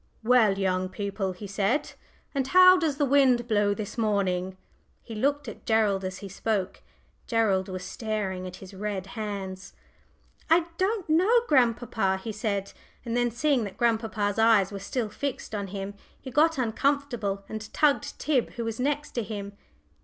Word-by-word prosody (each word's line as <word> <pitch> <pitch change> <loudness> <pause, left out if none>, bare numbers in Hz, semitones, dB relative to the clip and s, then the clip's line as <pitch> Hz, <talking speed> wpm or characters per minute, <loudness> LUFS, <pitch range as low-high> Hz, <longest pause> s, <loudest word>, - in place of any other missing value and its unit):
"Well, 225 -4 +4
young 185 -1 0
people," 195 0 -3
he 180 +3 -9
said, 205 +9 0 0.4
"and 270 -2 -1
how 365 +2 +8
does 320 -6 0
the 290 - +2
wind 260 -3 +4
blow 205 -2 +2
this 215 +2 -6
morning?" 190 -4 0 0.5
He 230 - -9
looked 280 +6 0
at - - -8
Gerald 215 -4 +2
as 185 0 -4
he - - -5
spoke. 200 0 -2 0.5
Gerald 200 -5 +1
was 185 -1 -5
staring 190 -2 -3
at 180 - -8
his 190 +1 -12
red 195 -1 -4
hands. 195 -3 -6 0.8
"I 330 +1 +5
don't 390 0 0
know, 375 +10 +4
grandpapa," 235 -7 +2
he 205 +4 -6
said; 200 -2 -3 0.3
and 230 0 -2
then 240 0 +2
seeing 260 +1 +1
that 200 - -8
grandpapa's 220 -3 0
eyes 220 -4 +5
were 200 - -5
still 220 +3 -3
fixed 260 +2 -5
on 200 -2 -3
him, 195 +1 -5 0.3
he 260 - -9
got 315 +4 +3
uncomfortable, 240 -5 -1
and 220 0 -7
tugged 295 -2 +1
Tib, 275 -6 0
who 235 - -4
was 225 0 -4
next 290 +3 -1
him. 205 -3 -4
220 Hz, 160 wpm, -27 LUFS, 195-260 Hz, 0.8 s, how